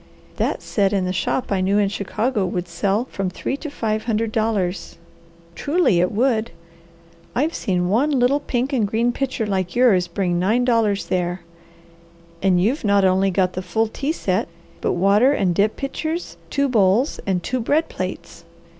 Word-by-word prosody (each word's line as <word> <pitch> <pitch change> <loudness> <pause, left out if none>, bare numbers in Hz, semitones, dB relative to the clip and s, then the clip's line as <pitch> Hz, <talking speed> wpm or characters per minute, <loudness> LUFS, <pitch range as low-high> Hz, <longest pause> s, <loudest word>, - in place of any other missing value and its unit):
"That - - -1
set 200 -1 +1
in 190 -2 +1
the 185 - -1
shop 225 +6 -1
I 195 -2 +1
knew 195 +2 +2
in 205 -1 +3
Chicago 210 +3 -1
would 180 -1 -2
sell 195 +6 0
for - - -26
from 195 -2 -2
three 185 +8 -3
to 305 - -6
five 220 -5 -2
hundred 225 -1 0
dollars. 210 -7 -1 0.6
Truly 290 - +2
it 180 +1 +2
would! 230 0 +1 0.9
I've 300 +6 +1
seen 180 -2 -1
one 235 +10 +2
little 270 0 +2
pink 265 0 -2
and 225 -6 +2
green 230 +4 +1
pitcher 260 -3 -2
like 190 -2 -2
yours 215 -8 +4
bring 175 0 -1
nine 220 +7 +2
dollars 215 -6 +1
there. 175 0 -1 1.0
And 185 -2 +3
you've 230 - +1
not 200 -2 +3
only 190 +1 +3
got 185 -1 +1
the 185 - -3
full 185 +5 0
tea 275 +6 -2
set, 190 - -1 0.3
but - - 0
water 200 +9 +4
and 190 -10 +1
dip 205 +5 +1
pitchers, 315 +5 -4
two 280 0 +1
bowls, 220 +2 +2
and 180 -3 0
two 255 - -2
bread 295 +7 +1
plates. 180 -2 -6
205 Hz, 175 wpm, -21 LUFS, 185-245 Hz, 1.0 s, yours